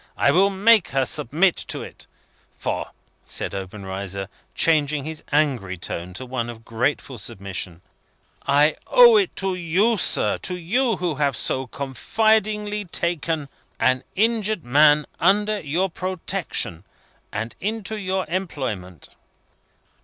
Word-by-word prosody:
I 140 - +4
will 190 +6 +4
make 205 +1 +4
her 135 -1 0
submit 165 +10 +1
herself - - -6
to - - -3
it. - - -11 0.5
For," - - -3 0.4
said - - -3
Obenreizer, 95 0 -5 0.3
changing 150 -3 +2
his 155 +1 -5
angry 130 -11 +1
tone 85 +1 -6
to 130 - -6
one 120 -2 -3
of 115 -1 -10
grateful 125 +2 -2
submission, 100 -5 -5 0.6
"I 145 +2 +4
owe - - +8
it 390 -3 +1
to 195 -1 -1
you, 180 +6 +1
sir; - - +3
to 180 0 -2
you, 230 +8 +1
who 175 -3 -1
have 140 -1 0
so 130 0 0
confidingly 210 - 0
taken 165 -3 -1 0.3
an 130 0 +2
injured 215 -2 +1
man 150 +4 +5
under 210 +3 +3
your 170 +4 0
protection, 180 - -2 0.5
and 115 +2 -4
into 220 +1 -3
your 190 -2 -2
employment." 130 - -4
155 Hz, 130 wpm, -23 LUFS, 120-195 Hz, 0.6 s, owe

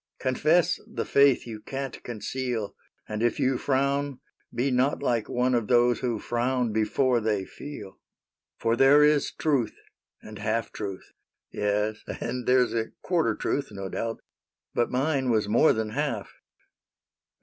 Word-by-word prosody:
Confess 155 +6 +2
the - - -4
faith 140 -2 +4
you 110 -2 -7
can't 135 +3 -6
conceal; 120 -1 -4 0.3
And 105 0 -4
if 120 -1 +1
you 130 -1 +1
frown, 140 0 0 0.3
be 130 +3 0
not 130 +3 +1
like 120 -5 0
one 125 +1 +1
Of 115 -3 +1
those 120 -1 +4
who 120 -3 -1
frown 120 +1 -1
before 120 +3 +2
they 105 -3 -1
feel. 105 -8 -9 0.3
" - - -66
For 115 0 +1
there 135 +4 +6
is 150 -1 +3
truth, 135 -8 0 0.4
and 110 -1 -11
half 110 +1 -1
truth, 100 -3 -6 0.2
— - - -62
yes. 105 +1 -1 0.2
And 125 +1 -4
there 125 0 +5
's 115 - -7
a 115 -1 -1
quarter 160 -12 +1
truth, 140 +5 -1
no 100 -2 -6
doubt; 115 +3 -4 0.5
But 120 - +1
mine 135 0 0
was 110 -3 +2
more 120 +9 +5
than 110 -1 -1
half. 125 -5 -3
120 Hz, 155 wpm, -27 LUFS, 110-135 Hz, 0.5 s, there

